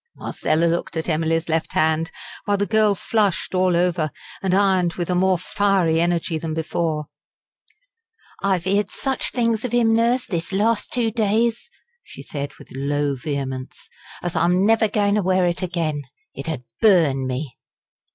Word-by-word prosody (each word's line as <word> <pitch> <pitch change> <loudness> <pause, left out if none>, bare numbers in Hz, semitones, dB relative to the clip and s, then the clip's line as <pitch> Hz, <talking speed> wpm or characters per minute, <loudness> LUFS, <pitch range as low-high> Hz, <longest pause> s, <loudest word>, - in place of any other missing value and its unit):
Marcella 155 +2 0
looked 170 0 -1
at 160 - -2
Emily's 165 0 0
left 160 -1 -1
hand, 160 +1 +2 0.4
while 205 -2 +1
the 205 - +1
girl 215 -1 +3
flushed 200 -3 0
all 185 -1 +2
over, 175 -3 +1 0.3
and 190 - 0
ironed 190 -3 +2
with 175 0 -2
a - - +2
more 185 +1 +3
fiery 180 -3 +1
energy 170 -1 0
than 160 -1 -4
before. 160 -1 -1 1.4
"I've 190 -3 0
'eerd 200 +1 +1
such 265 -2 -2
things 230 -3 0
of 245 -1 -1
'im, 230 -2 +4
Nurse, 235 +3 +2
this 175 -5 -4
last 210 +3 +1
two 235 -2 +1
days," 225 +1 0 0.3
she - - -11
said 140 -1 -5
with - - -15
low 140 +1 -1
vehemence 135 -1 -5 0.3
"as 175 -1 -3
I'm 175 +3 +3
never 225 0 +4
goin' 205 -1 +1
to 210 - +2
wear 185 -1 +2
it 175 +1 -1
again. 165 -5 -2 0.3
It - - -6
'ud 150 -6 -4 0.2
burn 160 -11 +4
me!" 130 0 -5
180 Hz, 160 wpm, -22 LUFS, 160-205 Hz, 1.4 s, im